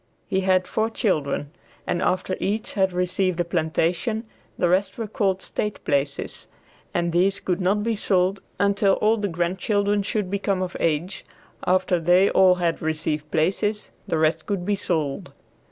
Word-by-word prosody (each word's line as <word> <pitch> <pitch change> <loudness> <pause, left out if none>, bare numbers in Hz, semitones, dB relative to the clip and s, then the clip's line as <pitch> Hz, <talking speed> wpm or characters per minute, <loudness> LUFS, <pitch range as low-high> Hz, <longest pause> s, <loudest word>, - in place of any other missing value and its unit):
He 190 - 0
had 185 -1 +2
four 220 +1 0
children, 150 -9 -1 0.3
and 175 - -1
after 185 0 0
each 210 +3 -2
had 190 -2 +2
received 180 0 0
a 175 - +1
plantation, 175 +7 0 0.3
the 175 - +2
rest 185 +3 +1
were 230 - -2
called 195 -3 -1
state 210 -1 -3
places, 140 0 -2 0.4
and 170 0 0
these 190 +4 +2
could 185 -1 -1
not 200 +3 +1
be 230 0 0
sold 190 -1 +1 0.2
until 200 -1 +3
all 215 +3 +2
the 205 -1 -1
grandchildren 200 +4 0
should 200 -1 -2
become 195 -1 0
of 180 - -5
age; 165 +3 -1 0.4
after 185 -1 +2
they 180 +4 +4
all 185 -1 +5
had 170 -2 -1
received 155 -1 -2
places, 200 +7 0 0.2
the 165 - 0
rest 155 +1 +1
could 195 -4 -2
be 205 +1 +1
sold. 155 -8 -2
185 Hz, 160 wpm, -24 LUFS, 170-200 Hz, 0.4 s, all